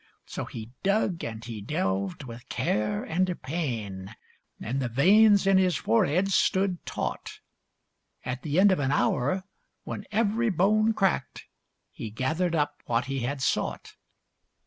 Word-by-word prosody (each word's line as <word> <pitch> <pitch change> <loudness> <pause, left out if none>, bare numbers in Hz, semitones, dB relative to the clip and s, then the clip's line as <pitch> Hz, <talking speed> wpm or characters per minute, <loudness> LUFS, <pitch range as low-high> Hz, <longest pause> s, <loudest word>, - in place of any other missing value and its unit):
So - - -5
he 115 0 -8
dug, 195 -3 +1
and 115 0 -6
he 115 -3 -6
delved, 100 - -2
with 120 0 -10
care 105 -3 -1
and 180 +1 -1
pain, 115 - -4 0.4
And 125 +5 -3
the 125 - -1
veins 200 - +5
in 195 -1 +5
his 185 -2 +2
forehead 160 - +2
stood 190 -1 +1
taut. - - -4 0.9
At 125 0 -3
the 155 +3 0
end 200 +1 +6
of 185 - +1
an 135 -1 0
hour, 145 +5 +1 0.4
when 200 - -6
every 225 +2 +1
bone 215 +4 +3
cracked, 190 -10 0 0.5
He 110 - -7
gathered 160 - -1
up 145 -1 -1
what 120 +2 +1
he 135 0 -3
had 130 +2 -3
sought. - - -1
145 Hz, 145 wpm, -27 LUFS, 115-190 Hz, 0.9 s, end